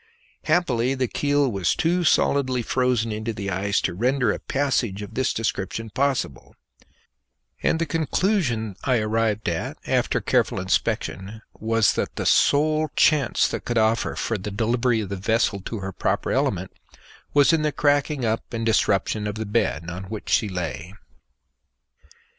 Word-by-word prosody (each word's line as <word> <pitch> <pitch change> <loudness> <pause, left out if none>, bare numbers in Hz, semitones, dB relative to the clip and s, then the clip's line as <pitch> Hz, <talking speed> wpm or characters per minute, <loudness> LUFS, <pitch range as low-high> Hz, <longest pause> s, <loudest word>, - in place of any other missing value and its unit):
Happily 130 -7 +1
the 130 -1 0
keel 145 0 +1
was 95 -5 0
too 175 +2 +1
solidly 130 -5 +2
frozen 125 -2 0
into 110 +2 -3
the 100 -2 -4
ice 100 +3 0
to - - -1
render 125 +4 +1
a - - -3
passage 125 -8 -1
of 100 - -9
this 130 0 0
description 110 0 -3
possible; 130 - -2 1.1
and - - +2
the 165 - 0
conclusion 155 - 0
I 130 -2 +2
arrived 110 -1 0
at 85 -1 -2
after - - +1
careful - - +1
inspection 105 +4 -2
was 115 0 +2
that - - -3
the - - -3
sole 155 +2 +3
chance 150 -6 +3
that - - -4
could 120 - -1
offer 110 +1 +1
for 115 -3 -2
the 100 +3 -5
delivery 115 +2 +1
of 100 - -5
the 100 - -4
vessel 110 +1 +1
to 110 -4 -5
her 95 0 -4
proper - - -1
element - - 0 0.6
was 145 +1 +5
in 160 - +2
the 150 0 +1
cracking 145 -2 +1
up 110 0 -2
and 115 0 -2
disruption 105 -1 +1
of 105 - -4
the 110 0 -4
bed 100 -7 -1
on 90 +3 -6
which 105 +2 -7
she 105 - +2
lay. 90 +1 -5
115 Hz, 160 wpm, -24 LUFS, 105-135 Hz, 1.1 s, was